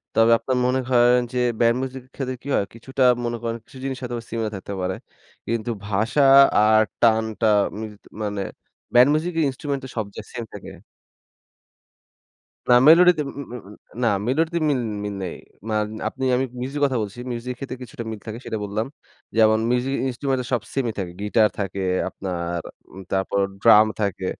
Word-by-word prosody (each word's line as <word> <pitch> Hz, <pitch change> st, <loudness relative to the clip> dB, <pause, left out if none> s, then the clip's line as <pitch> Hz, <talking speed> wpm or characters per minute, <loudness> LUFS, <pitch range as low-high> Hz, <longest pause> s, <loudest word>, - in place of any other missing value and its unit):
তবে 115 Hz, +1 st, +5 dB
আপনার 125 Hz, +2 st, -1 dB
মনে 130 Hz, +1 st, +2 dB
করেন 125 Hz, 0 st, +5 dB
যে -, -, -2 dB, 0.2 s
ব্যান্ড 115 Hz, +1 st, +4 dB
মিউজিক 130 Hz, 0 st, -5 dB
এর -, -, -28 dB
ক্ষেত্রে 130 Hz, -2 st, -3 dB
কি -, -, -10 dB
হয়? 100 Hz, -, +1 dB
কিছুটা 130 Hz, +3 st, -2 dB, 0.2 s
মনে 120 Hz, 0 st, -2 dB
করেন, 115 Hz, 0 st, -2 dB
কিছু 130 Hz, -, -15 dB
জিনিস 135 Hz, -1 st, -3 dB
হয়তোবা 120 Hz, -2 st, -4 dB
সিমিলার 110 Hz, -2 st, -2 dB
থাকতে 100 Hz, +1 st, -7 dB
পারে। 90 Hz, 0 st, -1 dB, 0.5 s
কিন্তু 115 Hz, 0 st, -2 dB, 0.2 s
ভাষা 110 Hz, +7 st, +1 dB, 0.3 s
আর 110 Hz, +1 st, +5 dB, 0.2 s
টানটা 110 Hz, -1 st, +2 dB, 0.3 s
মিলত 105 Hz, -2 st, -8 dB, 0.2 s
মানে 105 Hz, -1 st, -2 dB, 0.5 s
ব্যান্ড 125 Hz, +3 st, +7 dB
মিউজিক 165 Hz, +4 st, -1 dB
এর 160 Hz, -, +3 dB
ইন্সট্রুমেন্ট 140 Hz, +1 st, -4 dB
তো 130 Hz, -, -8 dB
সব 110 Hz, -, 0 dB
যে -, -, -4 dB
সেম 120 Hz, -, -4 dB
থাকে -, -, -9 dB, 2.0 s
না 125 Hz, -, +7 dB
মেলোডিতে 170 Hz, 0 st, +7 dB
উম -, -, -11 dB
উম -, -, -9 dB
উম 120 Hz, -, -7 dB
উম 105 Hz, -, -12 dB, 0.3 s
না -, -, +4 dB, 0.2 s
মেলোডিতে 165 Hz, +5 st, +1 dB
মিল 135 Hz, -4 st, +1 dB, 0.2 s
মিল 105 Hz, -1 st, -4 dB
নেই। 90 Hz, -, -5 dB, 0.3 s
মান 105 Hz, -1 st, 0 dB, 0.2 s
আপনি 130 Hz, -, -5 dB
আমি 130 Hz, +2 st, +1 dB, 0.2 s
মিউজিক 140 Hz, +3 st, -4 dB
কথা 130 Hz, -3 st, 0 dB
বলছি। 105 Hz, +2 st, -6 dB
মিউজিকের 120 Hz, +1 st, -5 dB
ক্ষেত্রে 130 Hz, -1 st, -6 dB
কিছুটা 120 Hz, -1 st, -8 dB
মিল 110 Hz, -, -6 dB
থাকে 110 Hz, +1 st, -5 dB
সেটা 110 Hz, -, -3 dB
বললাম। 105 Hz, +3 st, -2 dB, 0.5 s
যেমন 110 Hz, -1 st, +5 dB
মিউজিক 125 Hz, +2 st, 0 dB
ইন্সট্রুমেন্ট 130 Hz, +1 st, -1 dB
সব 120 Hz, -3 st, +1 dB
সেমই 125 Hz, -5 st, -1 dB
থাকে। 90 Hz, -3 st, -4 dB
গিটার 105 Hz, +1 st, +3 dB
থাকে 100 Hz, -1 st, -3 dB, 0.3 s
আপনার, 85 Hz, -2 st, -4 dB, 0.3 s
উম 95 Hz, -, -9 dB
তারপর 95 Hz, +1 st, 0 dB, 0.2 s
ড্রাম 110 Hz, -2 st, +7 dB, 0.2 s
থাকে, 100 Hz, -2 st, -1 dB
115 Hz, 175 wpm, -23 LUFS, 105-130 Hz, 2.0 s, ব্যান্ড